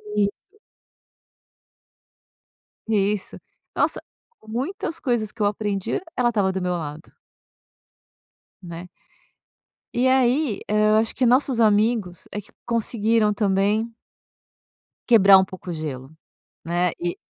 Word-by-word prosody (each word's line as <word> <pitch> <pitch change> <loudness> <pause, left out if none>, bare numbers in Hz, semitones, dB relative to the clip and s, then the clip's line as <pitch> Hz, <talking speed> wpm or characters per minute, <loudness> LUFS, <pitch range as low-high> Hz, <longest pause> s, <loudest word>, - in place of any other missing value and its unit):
Isso. 200 -1 +2 2.6
Isso. 205 -2 0 0.4
Nossa, - - +1 0.5
muitas 310 - -4
coisas 235 -7 -1
que 230 - -10
eu - - +3
aprendi, 205 -1 -1 0.2
ela 245 -1 +2
estava 205 -5 +1
do 190 0 -3
meu 180 0 -1
lado. 155 -2 -6 1.5
Né. 170 0 -8 1.1
E 250 +2 +2
aí, 260 -2 +2
hã, 215 0 +4
acho 225 0 -1
que 255 - 0
nossos 250 0 +3
amigos 215 -4 +2
é 210 - -4
que 210 - -13 0.2
conseguiram 225 -2 +1
também 205 +3 +1 1.2
quebrar 200 -5 +8
um 190 - +3
pouco 185 -1 -10
o - - -2
gelo, 145 -4 -6 0.5
né. 175 +1 +1
E 175 0 -2
210 Hz, 110 wpm, -23 LUFS, 190-230 Hz, 2.6 s, quebrar